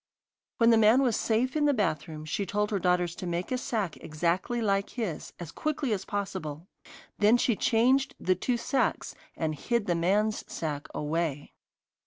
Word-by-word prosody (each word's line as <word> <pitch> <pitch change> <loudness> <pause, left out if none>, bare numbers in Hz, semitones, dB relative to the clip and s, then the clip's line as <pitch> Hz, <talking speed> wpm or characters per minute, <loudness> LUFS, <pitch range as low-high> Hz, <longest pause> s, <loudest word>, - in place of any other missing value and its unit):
When 230 0 +5
the 225 - +5
man 225 +5 +5
was 240 -5 +2
safe 235 +4 0
in 300 -1 +2
the 290 -2 +3
bathroom 155 - -2
she 155 +6 -2
told 210 +3 -1
her 200 - 0
daughters 180 -1 +1
to 180 - -5
make 175 +4 -3
a 255 - +1
sack 210 -9 -2
exactly 170 +9 -1
like 200 -3 +1
his, 215 -11 -4
as 170 -3 -7
quickly 295 -5 -1
as 195 -2 -3
possible. 185 -6 -4 0.5
Then 215 +3 +5
she 240 -1 +2
changed 255 +6 +2
the 185 - +2
two 240 +7 -1
sacks, 260 +3 -1 0.2
and 160 -1 -1
hid 235 +8 -1
the 175 - +1
man's 200 +6 +1
sack 150 -3 -4
away. 150 -1 -2
200 Hz, 175 wpm, -28 LUFS, 170-235 Hz, 0.5 s, When